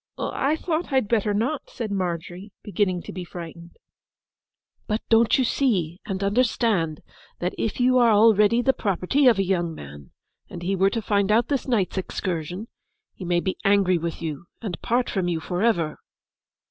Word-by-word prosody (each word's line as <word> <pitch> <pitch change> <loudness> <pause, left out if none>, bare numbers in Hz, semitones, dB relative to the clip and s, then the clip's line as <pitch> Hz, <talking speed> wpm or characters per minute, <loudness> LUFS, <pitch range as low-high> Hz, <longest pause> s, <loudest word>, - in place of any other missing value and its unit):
'I 285 +3 0
thought 320 0 -3
I'd 260 -5 +2
better 210 -2 +1
not!' 235 +9 -1
said 225 -4 -5
Margery, 180 +1 -4
beginning 195 -4 -1
to - - -8
be 180 +1 -5
frightened. 170 -1 -10 1.1
'But 215 0 -1
don't 225 0 +4
you 265 - +2
see 190 - 0
and 195 -1 -3
understand 205 -7 +1 0.4
that 180 +1 -2
if 225 - -3
you 255 +1 +4
are 240 -1 +5
already 220 +1 +5
the 265 - +3
property 220 +5 +1
of 235 - +5
a 195 - +1
young 175 -3 -1
man, 70 - -11 0.4
and 175 - -8
he 195 +3 0
were 195 +1 +3
to 225 +2 -3
find 200 -1 +1
out 230 +3 +3
this 280 -2 -1
night's 205 -6 0
excursion, 180 +2 -4 0.5
he - - -10
may 175 0 +1
be 190 - -3
angry 195 -3 +3
with 170 0 -5
you 155 0 -5
and 190 -8 -6
part 245 +1 +1
from 190 -4 -1
you 170 -2 -1
for 175 +3 -3
ever? 170 -9 +1
200 Hz, 175 wpm, -24 LUFS, 175-230 Hz, 1.1 s, are